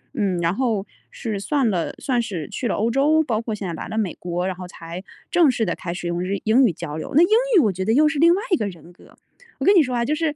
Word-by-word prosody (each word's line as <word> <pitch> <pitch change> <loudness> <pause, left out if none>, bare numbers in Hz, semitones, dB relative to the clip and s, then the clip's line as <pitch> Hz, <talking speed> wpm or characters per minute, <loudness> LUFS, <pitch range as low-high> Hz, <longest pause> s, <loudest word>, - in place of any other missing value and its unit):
嗯， 200 -7 0
然 170 +1 +1
后 220 -4 -1 0.2
是 215 -4 -5
算 275 +5 0
了 175 -4 -1
算 250 -3 -1
是 180 -9 -5
去 250 - -3
了 - - -1
欧 225 +3 0
洲 300 +5 +3
包 230 -7 -1
括 230 -2 -4
现 200 -2 -5
在 170 - -4
来 160 - -6
了 220 - -5
美 205 -5 -1
国， 175 0 -3
然 190 -1 -2
后 180 0 -8
才 170 +1 -9 0.3
正 340 -4 +5
式 240 -3 0
地 - - -1
开 170 - -6
始 180 +1 -6
用 175 0 -2
日 185 +2 -2
英 230 +5 +4
语 - - +1
交 150 -2 -6
流。 160 - -6
那 320 - +7
英 350 - +2 0.3
语 - - +8
我 220 -10 +3
觉 190 +1 -3
得 220 +4 +1
又 300 +5 +5
是 300 -1 -1
另 335 +2 +6
外 395 - -2
一 - - +6
个 215 -10 -2
人 175 -2 -11
格。 - - -20 0.4
我 - - -3
跟 400 - +6
你 350 - +7
说 255 -4 -1
啊， 235 0 0
就 290 - 0
是 310 -1 -1
220 Hz, 320 characters per minute, -22 LUFS, 180-275 Hz, 0.4 s, 语